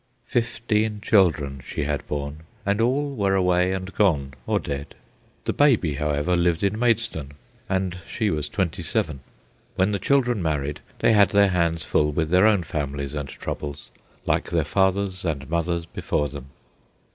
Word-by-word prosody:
Fifteen 110 -2 0
children 80 - +2
she - - -3
had 75 -1 -2
borne, 70 +1 -4 0.3
and 100 +2 +1
all 140 +4 +1
were 100 -4 +1
away 90 -1 +3
and 95 0 -4
gone, 75 -10 +2
or - - +2
dead. 70 0 -5 0.5
The - - 0
"baby," 120 - +3
however, 75 +4 0
lived 85 0 +1
in 100 +2 +1
Maidstone, 115 - 0 0.4
and 95 -1 -1
she 110 -4 -1
was 75 -2 -2
twenty 95 -5 -1
seven. 75 -3 -1 0.6
When 95 +3 +2
the 100 - -1
children 120 -1 +2
married 75 -3 -1 0.2
they 115 - +3
had 105 -2 +6
their 100 -1 +4
hands 85 -3 0
full 75 0 +2
with 80 +1 -1
their 95 +4 +6
own 105 -5 +3
families 70 -3 -3
and 75 -2 -4
troubles, 70 +1 -6 0.3
like - - 0
their 85 -2 +1
fathers 95 +2 +1
and 75 -5 -2
mothers 85 +1 -1
before 75 -3 -2
them. 65 - -9
90 Hz, 160 wpm, -24 LUFS, 75-100 Hz, 0.6 s, had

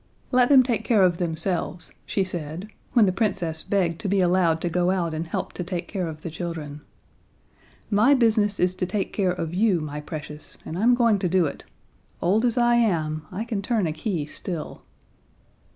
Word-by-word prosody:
"Let 250 -1 +4
them 270 -3 +7
take 235 -3 -1
care 220 -3 +3
of 175 -2 +2
themselves," 170 +1 -2
she 195 - +1
said, 175 +1 -4 0.2
when 235 -4 +6
the 185 - +2
Princess 185 -6 -1
begged 175 -4 0
to 215 - -3
be 195 +1 +2
allowed 175 -3 +3
to - - -1
go 180 +1 +1
out 175 -3 0
and 160 +1 -3
help - - -4
to 180 - -4
take 175 0 -4
care 185 -4 -3
of 155 -1 -7
the 165 - -6
children. 155 -3 -6 1.1
"My 220 +8 +5
business 220 -4 +2
is 180 0 +2
to 185 - -1
take 195 +1 -2
care 195 -3 +1
of 170 -2 -3
you, 195 -1 +2
my 150 -1 -5
precious, 150 0 -8
and 160 - -5
I'm 235 +7 +4
going 230 -4 +3
to 180 - 0
do 180 -1 +3
it. 145 - -6 0.5
Old 210 +7 +2
as 240 0 +2
I 240 0 +4
am, 155 -9 0
I 195 +4 -3
can 220 -4 -2
turn 215 -1 0
a 155 - -1
key 160 -1 -2
still." 165 +1 -6
185 Hz, 200 wpm, -24 LUFS, 165-210 Hz, 1.1 s, them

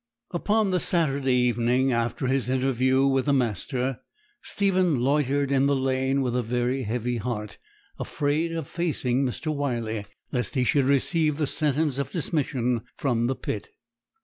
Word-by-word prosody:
Upon 205 +3 +1
the 180 - +2
Saturday 140 -7 +1
evening 125 +2 +2
after 115 +3 -1
his 130 -1 0
interview 130 0 +2
with 135 -1 +2
the 145 - +2
master, 125 +1 -1 0.4
Stephen 185 -7 +1
loitered 140 +1 +1
in 135 0 +3
the 140 - +2
lane 130 +1 +1
with 125 -1 -1
a 125 - +2
very 125 +3 -1
heavy 120 +1 -2
heart, 105 -3 -4 0.4
afraid 150 +3 -1
of 165 -4 -4
facing 140 -7 0
Mr. 155 +4 -2
Wyley, 115 -7 -2 0.2
lest 125 +3 -2
he 130 - +2
should 140 +1 +2
receive 150 +2 +2
the 155 - +1
sentence 145 -1 0
of 140 - -3
dismission 135 - -1 0.2
from 120 -4 +1
the 130 - 0
pit. 105 - -5
135 Hz, 150 wpm, -26 LUFS, 125-145 Hz, 0.4 s, in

